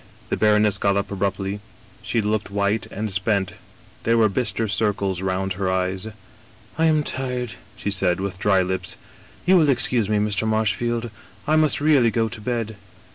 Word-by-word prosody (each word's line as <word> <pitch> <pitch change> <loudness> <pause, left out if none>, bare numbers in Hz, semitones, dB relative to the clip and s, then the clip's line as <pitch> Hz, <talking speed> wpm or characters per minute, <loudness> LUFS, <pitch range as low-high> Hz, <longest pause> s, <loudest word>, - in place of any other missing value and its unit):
' - - -26
" - - -26
The - - +2
baroness 105 -1 +3
got 100 0 +2
up 100 0 -2
abruptly. 100 0 -2 0.4
She 115 - 0
looked 105 0 -1
white 100 +2 0
and 105 0 -4
spent; 95 0 0 0.5
there 115 +1 +2
were 110 -1 +4
bister 115 +1 -1
circles 100 -3 0
round 95 0 -1
her 95 0 -2
eyes. 95 +2 -1 0.2
" - - -26
* - - -26
I 165 - +4
am 155 -2 +3
tired,' 125 -4 -3 0.2
she 100 - -3
said, 90 -2 +1
with 95 -1 -4
dry 95 -2 +3
lips. 95 +1 -3 0.2
* - - -25
You 185 +1 +6
will 155 -4 +4
excuse 120 -4 +3
me, 105 - +2
Mr. 105 0 0
Marshfield, 115 +2 0 0.3
I 155 - +2
must 155 -1 +3
really 145 -5 +4
go 115 0 0
to 110 0 -8
bed. 115 -2 -3
105 Hz, 190 wpm, -23 LUFS, 100-115 Hz, 0.5 s, You